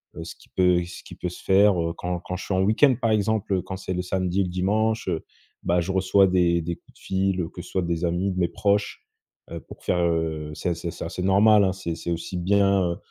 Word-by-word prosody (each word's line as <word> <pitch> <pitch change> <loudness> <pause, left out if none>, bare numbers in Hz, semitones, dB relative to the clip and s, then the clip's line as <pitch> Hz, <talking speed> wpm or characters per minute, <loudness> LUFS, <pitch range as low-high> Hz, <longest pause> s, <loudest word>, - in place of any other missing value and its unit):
heu 80 - -6
ce - - -8
qui - - -22
peut 90 -1 +2
ce 85 - -10
qui - - -11
peut 90 - -4
se - - -11
faire, 95 -2 +4
heu, 85 0 -2
quand 90 0 -3
quand 90 - -5
je - - -7
suis 95 - -2
en 95 - +2
week-end 115 +7 +4
par 115 - +2
exemple, 110 -1 0
heu, 90 - 0
quand 95 - -6
c'est 95 -1 -4
le 90 - -1
samedi 95 +1 -1
et - - +2
le 90 - -3
dimanche, 110 +4 0
heu, 80 -2 -2 0.4
bah, 90 0 +2
je 95 +3 -3
reçois 95 +1 +4
des 85 -2 +2
des 85 +1 -3
coups - - -25
de - - -21
fil, 95 -1 0
au 80 - -5
que 90 - -9
ce - - -12
soit 95 - 0
des 85 0 -2
amis, 90 +3 0
de - - -7
mes 85 - +1
proches, 100 0 -1 0.5
heu, - - -5
pour - - -14
faire, 90 - 0
heu, 80 -2 -1
c'est 90 -1 -2
c'est 85 0 -5
c'est - - -7
assez 90 +2 -5
normal 100 +2 +5
hein, 95 - +2
c'est 85 -3 -4
c'est 85 - -5
aussi 85 +2 -4
bien, 100 -1 +2
heu, - - -9
90 Hz, 270 wpm, -24 LUFS, 85-100 Hz, 0.5 s, normal